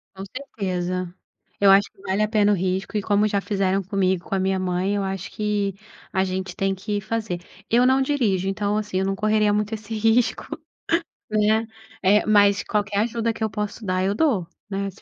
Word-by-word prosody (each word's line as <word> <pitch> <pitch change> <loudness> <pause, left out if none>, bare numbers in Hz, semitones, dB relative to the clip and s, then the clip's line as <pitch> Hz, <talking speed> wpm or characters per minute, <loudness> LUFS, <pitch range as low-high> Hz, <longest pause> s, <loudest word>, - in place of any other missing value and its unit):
Com 190 - -7
certeza, 185 -7 -4 0.5
eu 200 - +6
acho 195 +1 +5
que 195 - -22
vale 195 +1 -1
a - - +2
pena 210 -1 +3
o 205 - +4
risco, 190 +3 -1
e - - 0
como 205 +1 +2
já 200 -1 +1
fizeram 195 -2 0
comigo, 190 -2 0
com 195 - -1
a - - +1
minha 190 0 +1
mãe, 185 +2 0
eu 200 - 0
acho 190 -1 -4
que 205 -2 -1 0.4
a 190 -1 +2
gente 190 0 -3
tem 195 0 0
que 205 +2 -3
fazer. 215 -3 -3 0.3
Eu 245 +2 +4
não 265 +1 +4
dirijo, 230 -10 +1
então, 205 +1 0
assim, 205 -3 -2
eu 190 - 0
não 195 - 0
correria 215 0 +2
muito 210 +1 -1
esse 220 0 -6
risco, 225 +2 +2 0.8
né, 215 +1 +2 0.4
eh, 205 +3 +4
mas 205 -2 +4
qualquer 205 -1 -1
ajuda 230 0 0
que 225 - -5
eu 220 - +1
posso 210 +2 -4
dar, 185 0 0
eu 195 +2 +1
dou, 220 - +1 0.2
né, 200 0 -2
se 195 - -20
200 Hz, 205 wpm, -23 LUFS, 190-215 Hz, 0.8 s, eu